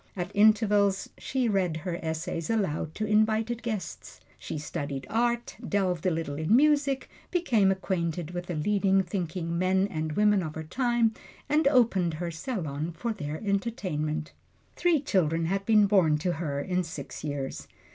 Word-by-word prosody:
At 180 Hz, +1 st, -3 dB
intervals 205 Hz, -2 st, +4 dB
she 260 Hz, -2 st, -1 dB
read 185 Hz, -6 st, +1 dB
her 175 Hz, -2 st, -2 dB
essays 160 Hz, 0 st, -3 dB
aloud 175 Hz, -8 st, -1 dB
to 215 Hz, -, -2 dB
invited 220 Hz, +2 st, +2 dB
guests. 220 Hz, -5 st, -5 dB, 0.2 s
She -, -, -5 dB
studied 145 Hz, -2 st, -4 dB
art, 235 Hz, +1 st, 0 dB
delved 190 Hz, -2 st, 0 dB
a -, -, +5 dB
little 160 Hz, -4 st, -3 dB
in 160 Hz, +8 st, +3 dB
music, 285 Hz, -1 st, +3 dB, 0.2 s
became 240 Hz, -, +2 dB
acquainted 175 Hz, -3 st, -2 dB
with 175 Hz, 0 st, -5 dB
the 175 Hz, -, -3 dB
leading 195 Hz, +3 st, +2 dB
thinking 170 Hz, -2 st, -3 dB
men 190 Hz, +1 st, +2 dB
and 155 Hz, -2 st, -3 dB
women 210 Hz, +1 st, +3 dB
of 155 Hz, -3 st, -5 dB
her 160 Hz, -, -4 dB
time, 235 Hz, -, +1 dB, 0.3 s
and 300 Hz, 0 st, +3 dB
opened 220 Hz, -, +3 dB
her 170 Hz, +1 st, -3 dB
salon 160 Hz, -, -4 dB
for 235 Hz, +3 st, -2 dB
their 150 Hz, -6 st, -5 dB
entertainment. 175 Hz, -7 st, -2 dB, 0.4 s
Three 345 Hz, -3 st, +3 dB
children 165 Hz, -, +1 dB
had 195 Hz, +3 st, -1 dB
been 215 Hz, -2 st, +6 dB
born 185 Hz, -7 st, +4 dB
to 175 Hz, +4 st, -1 dB
her 150 Hz, -4 st, -3 dB
in 180 Hz, +5 st, 0 dB
six 155 Hz, -4 st, -7 dB
years. 145 Hz, -3 st, -4 dB
190 Hz, 155 wpm, -28 LUFS, 160-220 Hz, 0.4 s, been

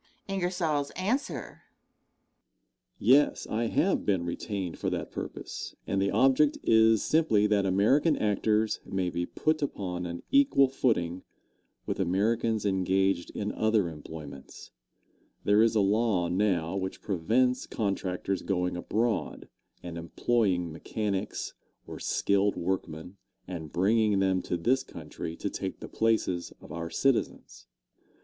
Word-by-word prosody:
Answer. 180 Hz, -, -2 dB, 1.4 s
Yes, 145 Hz, +3 st, +4 dB
I 115 Hz, +2 st, -1 dB
have 190 Hz, +11 st, +1 dB
been 95 Hz, -4 st, 0 dB
retained 90 Hz, +1 st, -4 dB
for -, -, -1 dB
that -, -, -4 dB
purpose, -, -, -6 dB
and 95 Hz, 0 st, 0 dB
the 100 Hz, -, +2 dB
object 135 Hz, +3 st, +3 dB
is 110 Hz, -1 st, +5 dB
simply 155 Hz, -10 st, +3 dB
that 105 Hz, -2 st, +2 dB
American 130 Hz, -, +3 dB
actors 105 Hz, +1 st, +1 dB
may 95 Hz, -2 st, -2 dB
be 85 Hz, +1 st, -2 dB
put 155 Hz, 0 st, 0 dB
upon 90 Hz, -10 st, -3 dB
an 85 Hz, 0 st, -6 dB
equal 275 Hz, -, +5 dB
footing 95 Hz, -10 st, 0 dB, 0.6 s
with -, -, -3 dB
Americans 105 Hz, +4 st, +1 dB
engaged 95 Hz, -1 st, +1 dB
in 105 Hz, 0 st, -2 dB
other 110 Hz, -5 st, +1 dB
employments. 75 Hz, -3 st, -10 dB, 0.7 s
There 105 Hz, +1 st, +4 dB
is 115 Hz, 0 st, +3 dB
a 105 Hz, -, +4 dB
law 100 Hz, -3 st, +2 dB
now 90 Hz, -3 st, +1 dB
which 95 Hz, -1 st, -4 dB
prevents 120 Hz, +8 st, +1 dB
contractors 95 Hz, -2 st, -2 dB
going 90 Hz, -2 st, -1 dB
abroad 110 Hz, +4 st, -2 dB, 0.3 s
and 85 Hz, -1 st, -6 dB
employing 90 Hz, 0 st, 0 dB
mechanics 100 Hz, +5 st, -3 dB, 0.3 s
or -, -, -8 dB
skilled 100 Hz, 0 st, +1 dB
workmen, 90 Hz, 0 st, -4 dB, 0.3 s
and 80 Hz, -5 st, -6 dB
bringing 105 Hz, +3 st, +2 dB
them 95 Hz, -1 st, +2 dB
to 90 Hz, -, -2 dB
this 125 Hz, +10 st, +2 dB
country 80 Hz, -, -7 dB
to -, -, -3 dB
take -, -, -4 dB
the -, -, -7 dB
places 110 Hz, -6 st, 0 dB
of -, -, -13 dB
our 85 Hz, 0 st, -4 dB
citizens. 135 Hz, +4 st, -1 dB
100 Hz, 125 wpm, -28 LUFS, 90-115 Hz, 1.4 s, is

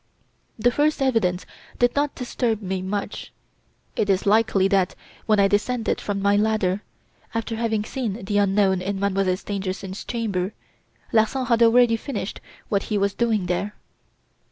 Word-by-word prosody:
"The 240 Hz, +2 st, +3 dB
first 295 Hz, +4 st, +1 dB
evidence 225 Hz, -9 st, +1 dB, 0.3 s
did 245 Hz, 0 st, +2 dB
not 290 Hz, 0 st, 0 dB
disturb 245 Hz, -3 st, -1 dB
me 190 Hz, 0 st, -2 dB
much. 200 Hz, +2 st, -4 dB, 0.6 s
It 205 Hz, -, 0 dB
is 190 Hz, -1 st, +2 dB
likely 205 Hz, -2 st, +3 dB
that, 195 Hz, -2 st, +1 dB, 0.3 s
when 215 Hz, -2 st, +4 dB
I 200 Hz, -, +6 dB
descended 220 Hz, +4 st, 0 dB
from 200 Hz, -1 st, -3 dB
my 200 Hz, 0 st, +4 dB
ladder, 205 Hz, -2 st, +1 dB, 0.5 s
after 230 Hz, 0 st, -2 dB
having 220 Hz, -2 st, 0 dB
seen 220 Hz, -6 st, -4 dB
the 205 Hz, +1 st, +1 dB
unknown 195 Hz, -2 st, +3 dB
in 195 Hz, +1 st, -3 dB
Mademoiselle 195 Hz, -2 st, +1 dB
Stangerson's 195 Hz, -1 st, -5 dB
chamber, 210 Hz, -5 st, -2 dB, 0.6 s
Larsan 230 Hz, +4 st, +2 dB
had 235 Hz, -1 st, +2 dB
already 230 Hz, 0 st, +5 dB
finished 225 Hz, -5 st, -5 dB, 0.3 s
what 200 Hz, -2 st, +1 dB
he 210 Hz, -, +1 dB
was 200 Hz, 0 st, +1 dB
doing 220 Hz, -5 st, +1 dB
there. 180 Hz, +4 st, -2 dB
205 Hz, 150 wpm, -23 LUFS, 195-230 Hz, 0.6 s, I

